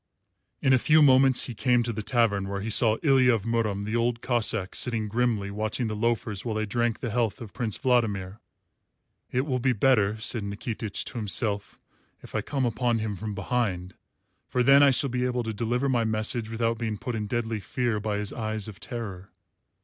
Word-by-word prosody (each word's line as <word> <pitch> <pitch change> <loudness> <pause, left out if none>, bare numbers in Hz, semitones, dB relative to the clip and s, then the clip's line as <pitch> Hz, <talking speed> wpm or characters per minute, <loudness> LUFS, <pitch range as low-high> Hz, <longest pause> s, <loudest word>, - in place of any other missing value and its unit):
In 130 - +4
a 130 - +5
few 155 +4 +5
moments 130 -2 +5
he 125 - -6
came 125 +1 +2
to 115 0 -2
the 110 - -4
tavern 105 -4 +1
where 100 0 -3
he 110 +2 -3
saw 110 0 +4
Ilya 130 -5 +5
of 105 - -4
Murom 110 -3 0
the 110 +2 -3
Old 120 0 +1
Cossáck 115 -6 0
sitting 115 -3 -1
grimly 110 -3 0
watching 110 +4 -2
the 110 -1 -3
loafers 105 -3 -1
while 115 -3 -3
they 110 0 -1
drank 120 +2 -1
the 120 - -3
health 115 -1 0
of 115 -5 -9
Prince 115 -4 -2
Vladimir. 105 -6 0 0.9
"It 125 - +1
will 130 -4 -1
be 125 +1 +2
better," 110 -3 +2
said 110 +1 -2
Nikitich 105 +1 -4
to 120 - -5
himself, 105 -1 -1 0.4
"if - - -12
I - - 0
come 135 -3 -2
upon 120 0 0
him 110 -2 -3
from 105 +2 -5
behind, 95 -4 -2 0.5
for 125 - +1
then 135 +3 +7
I 140 - +7
shall 135 0 +1
be 125 0 0
able 125 -1 -1
to 110 -1 -4
deliver 120 +5 -1
my 120 -3 +2
message 110 +1 -1
without 115 0 -1
being 110 -3 -2
put 125 - -5
in 105 -2 -3
deadly 115 0 -2
fear 120 +1 -1
by 105 0 -2
his 105 -1 -3
eyes 110 -2 -3
of 105 -3 -10
terror." 100 -6 -6
115 Hz, 205 wpm, -26 LUFS, 105-125 Hz, 0.9 s, then